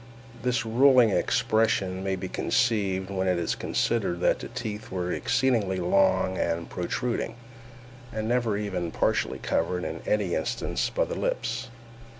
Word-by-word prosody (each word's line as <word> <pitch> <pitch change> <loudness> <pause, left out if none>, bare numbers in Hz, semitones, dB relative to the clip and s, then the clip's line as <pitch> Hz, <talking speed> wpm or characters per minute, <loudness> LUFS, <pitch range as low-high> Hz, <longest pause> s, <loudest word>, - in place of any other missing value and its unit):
This 125 -1 0
ruling 125 0 +5
expression 100 -4 +1
may 95 -1 0
be 95 - -5
conceived 100 -6 0
when 95 -1 -1
it 90 -1 +2
is 85 -1 0
considered 105 -7 -1
that - - +3
the - - -6
teeth 110 -3 -6
were 90 -1 -2
exceedingly 120 -6 +1
long 95 +1 +2
and 85 0 -1
protruding, 115 +5 -2 0.8
and 110 0 -3
never 120 -3 +1
even 95 -5 -2
partially - - 0
covered, 90 +2 -1
in - - -4
any 105 -5 +1
instance, - - -1
by - - 0
the - - -5
lips. 120 +2 -2
105 Hz, 145 wpm, -27 LUFS, 95-115 Hz, 0.8 s, ruling